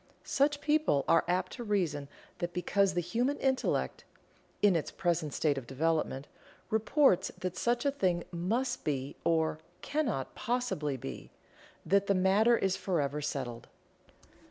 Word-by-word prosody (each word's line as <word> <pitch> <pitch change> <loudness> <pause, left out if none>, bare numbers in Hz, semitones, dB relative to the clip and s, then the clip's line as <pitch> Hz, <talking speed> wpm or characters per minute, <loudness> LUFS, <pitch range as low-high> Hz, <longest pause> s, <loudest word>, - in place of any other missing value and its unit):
Such 290 +1 +1
people 300 - +2
are 165 - +5
apt 180 +1 0
to 240 - -6
reason 170 -10 -1 0.3
that 175 0 -3
because 190 +1 +2
the 175 - +2
human 240 - 0
intellect 265 -1 0 0.6
(in 200 -3 +6
its 160 - -1
present 170 -4 -1
state 145 -2 +1
of 120 - -13
development) 145 -1 0 0.5
reports 220 - +3
that 185 -1 -4
such 240 +6 0
a 280 - +3
thing 180 -10 0
must 225 +9 -1
be, 140 -3 -2
or 160 -2 +1 0.2
cannot 260 - -1
possibly 235 - -1
be, 65 - -7 0.6
that 200 +1 +3
the 200 - +3
matter 200 +6 +4
is 190 -1 +1
forever 150 -5 -1
settled. 125 -5 -4
180 Hz, 140 wpm, -31 LUFS, 150-235 Hz, 0.6 s, in